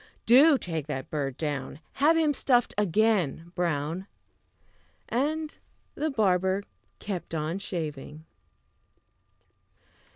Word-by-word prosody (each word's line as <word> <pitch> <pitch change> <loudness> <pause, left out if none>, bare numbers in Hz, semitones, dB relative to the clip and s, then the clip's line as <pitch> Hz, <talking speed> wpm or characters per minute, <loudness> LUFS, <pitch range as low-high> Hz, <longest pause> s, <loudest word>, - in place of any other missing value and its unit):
Do 275 +5 +7
take 160 - -4
that 135 -3 -5
bird 140 -3 -2
down; 145 -2 -4 0.2
Have 320 +3 +5
him 310 -2 +3
stuffed 245 -3 +2
again, 195 -5 +1
Brown!" 170 +1 -2 1.0
And 305 +5 -1 0.4
the 310 +2 -1
barber 190 -5 +1 0.3
kept 185 -5 -5
on 160 +4 -2
shaving. 155 -4 -6
180 Hz, 95 wpm, -27 LUFS, 155-240 Hz, 1.0 s, Do